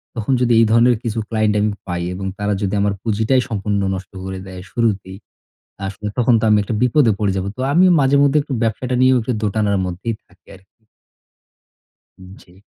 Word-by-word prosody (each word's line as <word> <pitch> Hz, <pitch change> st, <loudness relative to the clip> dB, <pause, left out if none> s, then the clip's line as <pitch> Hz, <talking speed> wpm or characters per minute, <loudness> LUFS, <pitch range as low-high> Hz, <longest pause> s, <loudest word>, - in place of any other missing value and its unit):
তখন 115 Hz, +3 st, -1 dB
যদি 120 Hz, -1 st, +3 dB
এই 115 Hz, -, +5 dB
ধরনের 120 Hz, +1 st, +4 dB
কিছু 115 Hz, -2 st, -2 dB
ক্লায়েন্ট 110 Hz, -2 st, +1 dB
আমি 105 Hz, 0 st, +1 dB, 0.2 s
পাই 90 Hz, 0 st, -3 dB
এবং 95 Hz, +2 st, -6 dB
তারা 105 Hz, 0 st, -1 dB
যদি 100 Hz, 0 st, -1 dB
আমার 100 Hz, 0 st, +1 dB
পুঁজিটাই 110 Hz, +4 st, +1 dB
সম্পূর্ণ 100 Hz, -1 st, -1 dB
নষ্ট 95 Hz, +1 st, -9 dB
করে 95 Hz, 0 st, -5 dB
দেয়, 90 Hz, -1 st, -9 dB
শুরুতেই। 100 Hz, -5 st, -1 dB, 0.7 s
আসলে 105 Hz, +2 st, -5 dB
তখন 120 Hz, 0 st, +3 dB
তো -, -, -1 dB
আমি 105 Hz, -, +5 dB
একটা 110 Hz, -, -4 dB
বিপদে 125 Hz, -2 st, +3 dB
পড়ে 100 Hz, -3 st, 0 dB
যাব। 95 Hz, -, -2 dB
তো -, -, -7 dB
আমিও 185 Hz, +3 st, +5 dB
মাঝে 135 Hz, +1 st, +3 dB
মধ্যে 145 Hz, +1 st, +3 dB
একটু 145 Hz, -, -8 dB
ব্যবসাটা 120 Hz, +3 st, -1 dB
নিয়েও 130 Hz, 0 st, +5 dB
একটু 125 Hz, +3 st, -2 dB
দোটানার 105 Hz, -1 st, 0 dB
মধ্যেই 95 Hz, +6 st, -4 dB
থাকি 95 Hz, -, -28 dB
আরকি। 95 Hz, +4 st, -27 dB, 1.4 s
উ -, -, -13 dB, 0.2 s
জি। 90 Hz, +3 st, -21 dB
105 Hz, 190 wpm, -19 LUFS, 100-120 Hz, 1.4 s, এই